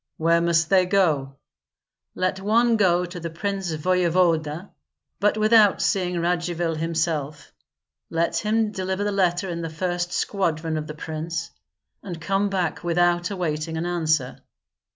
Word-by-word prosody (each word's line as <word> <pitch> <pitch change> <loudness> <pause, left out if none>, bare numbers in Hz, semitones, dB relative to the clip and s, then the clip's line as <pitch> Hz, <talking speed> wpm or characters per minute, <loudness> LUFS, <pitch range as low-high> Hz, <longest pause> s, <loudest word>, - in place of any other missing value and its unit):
"Where 165 +1 +3
must 165 -1 +1
they 185 -2 +4
go?" 155 -8 +1 0.8
"Let 185 +1 -1
one 230 +4 +3
go 180 -4 +3
to 175 0 -8
the 170 0 -5
prince 195 +1 -3
voevoda, 170 0 +1 0.5
but 210 +1 +2
without 215 -2 +5
seeing 180 -2 0
Radzivill 170 -1 -1
himself. 160 -3 -2 0.6
Let 170 +1 0
him 215 +4 +1
deliver 190 0 -2
the 205 - 0
letter 185 -1 +1
in 170 -2 -4
the 165 - -4
first 175 +2 -2
squadron 165 -5 -1
of 155 0 -3
the 150 - -7
prince, 160 +1 -5 0.5
and 175 -4 -7
come 195 +4 0
back 185 -4 -2
without 175 0 +2
awaiting 160 -4 -3
an 165 - -2
answer." 160 -6 0
175 Hz, 140 wpm, -24 LUFS, 165-190 Hz, 0.8 s, without